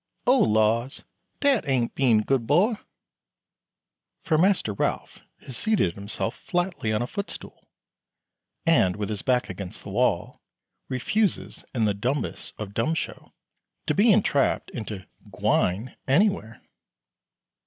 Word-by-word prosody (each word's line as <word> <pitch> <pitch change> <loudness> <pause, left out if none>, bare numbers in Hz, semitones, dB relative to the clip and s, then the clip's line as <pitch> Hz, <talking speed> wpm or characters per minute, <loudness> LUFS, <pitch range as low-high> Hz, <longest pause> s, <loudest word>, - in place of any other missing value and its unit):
Oh 255 +2 +5
laws! 110 - +2 0.4
dat 275 - +3
ain't 125 -4 +1
bein' 120 -6 +3
good 125 -1 0
bo'." 200 - +3 1.4
For 160 - +1
Master 185 - +2
Ralph - - -2 0.2
has 130 - -8
seated 195 - +1
himself 100 +3 -4
flatly 175 - -1
on 110 +2 +1
a - - -1
footstool, 200 +11 -7 1.0
and 145 - +4
with 105 -1 -3
his 105 -2 -3
back 125 -1 +1
against 95 0 -7
the - - -8
wall, - - 0 0.5
refuses 185 - -1
in 115 -3 +2
the 105 - +2
dumbest 125 +8 -3
of 100 -2 -6
dumb 135 +10 0
show - - -5 0.5
to - - +1
be 215 +3 +5
entrapped 190 -10 +2
into 110 -5 -6 0.2
"gwine" 100 +8 0
anywhere. 145 - +1
125 Hz, 125 wpm, -25 LUFS, 110-175 Hz, 1.4 s, Oh